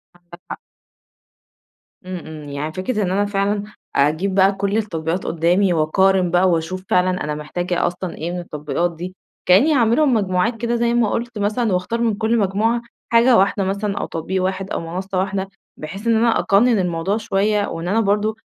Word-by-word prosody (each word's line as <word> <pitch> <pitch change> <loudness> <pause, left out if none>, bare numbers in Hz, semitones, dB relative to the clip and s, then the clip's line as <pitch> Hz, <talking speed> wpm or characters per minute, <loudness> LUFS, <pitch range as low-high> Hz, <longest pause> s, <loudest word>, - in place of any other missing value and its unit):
عندك 175 0 -16
حق. - - -6 1.5
إمم، 185 0 -5
إمم. 155 -2 -9
يعني 145 +2 -4
فكرة 210 +4 -2
إن 180 - -1
أنا 200 +2 +1
فعلًا 200 0 -1 0.3
أجيب 155 +7 +1
بقى 195 0 +5
كل 200 +2 -1
التطبيقات 175 -4 -2
قُدّامي 175 +3 +2
وأقارن 180 +3 +2
بقى 180 +2 +4
وأشوف 175 +2 -1
فعلًا 180 0 +2
أنا 150 0 -3
محتاجة 175 +4 -2
أصلًا 180 0 -5
إيه 165 +2 -4
من 180 - -4
التطبيقات 170 +1 -3
دي، 180 +3 -7 0.3
كإنّي 210 +13 +5
هاعملهم 255 +2 +3
مجموعات 205 +1 +1
كده 235 0 0
زي 235 0 +1
ما 240 -3 +2
قُلت 235 +1 -3
مثلًا 210 +1 0
وأختار 185 +6 -1
من 230 -2 +2
كل 220 +2 +1
مجموعة 220 +3 +1 0.3
حاجة 235 +1 +5
واحدة 195 +1 +2
مثلًا 200 +1 -2
أو - - -2
تطبيق 185 +3 -3
واحد 190 +1 -2
أو - - -1
منصّة 185 +3 -4
واحدة، 195 0 -2 0.3
بحيث 195 +9 -7
إن 230 - +4
أنا 230 +1 +3
أقَنِّن 220 +3 +3
الموضوع 180 +2 -1
شوية 210 -1 0
وإن 165 +1 -5
أنا 205 +5 +2
برضه 210 0 +1
195 Hz, 180 wpm, -20 LUFS, 175-215 Hz, 1.5 s, بقى